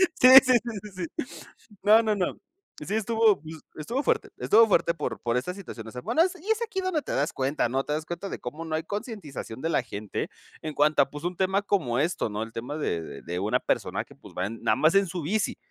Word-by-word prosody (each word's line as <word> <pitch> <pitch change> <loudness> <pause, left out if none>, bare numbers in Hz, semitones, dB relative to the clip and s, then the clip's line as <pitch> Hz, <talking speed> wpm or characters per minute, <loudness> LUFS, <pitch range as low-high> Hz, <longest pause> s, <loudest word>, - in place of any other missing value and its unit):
Sí, 255 - +6 0.2
sí, 255 - +3
sí, 230 -4 -6
sí, 180 -2 -4 0.2
sí. - - -12 0.4
No, 215 +3 +6
no, 215 -1 +1
no. 180 -2 -1 0.5
Sí 205 - -3
estuvo 220 -4 +3 0.4
estuvo 235 - -2
fuerte, - - 0
estuvo 225 +2 +5
fuerte 170 -4 +2
por 150 - -4
por 120 0 0
estas 160 +9 -2
situaciones. 115 - -9
Bueno, 320 - +3
es 370 +1 0
y 405 - -6
es 445 +1 +2
aquí 425 -4 -2
donde 370 -5 -1
te - - -5
das 145 +3 0
cuenta, 135 -2 0
¿no? 135 +2 -1
Te 150 - -3
das 155 +1 -2
cuenta 175 +3 -5
de - - -5
cómo 150 +7 -6
no 160 -1 -4
hay 160 - 0
concientización 200 - -6
de 160 - -1
la 150 -6 +1
gente 105 -3 -5 0.3
en 155 - -4
cuanto 150 0 +4
a, 135 - -2
pues, 150 +2 -8
un 175 0 -2
tema 190 +1 +1
como 155 -13 0
esto, 155 -5 0
¿no?, 105 +1 -3
el 115 - -6
tema 125 +7 -5
de 85 - -1
de - - -9
de 90 +1 -4
una 100 +3 +1
persona - - -1
que, - - -17
pues, - - -15
va 90 +2 -1
nada 115 - 0
más 155 +4 +3
en 195 -1 +4
su 175 0 -4
bici. 205 +7 0
165 Hz, 240 wpm, -27 LUFS, 135-210 Hz, 0.5 s, Sí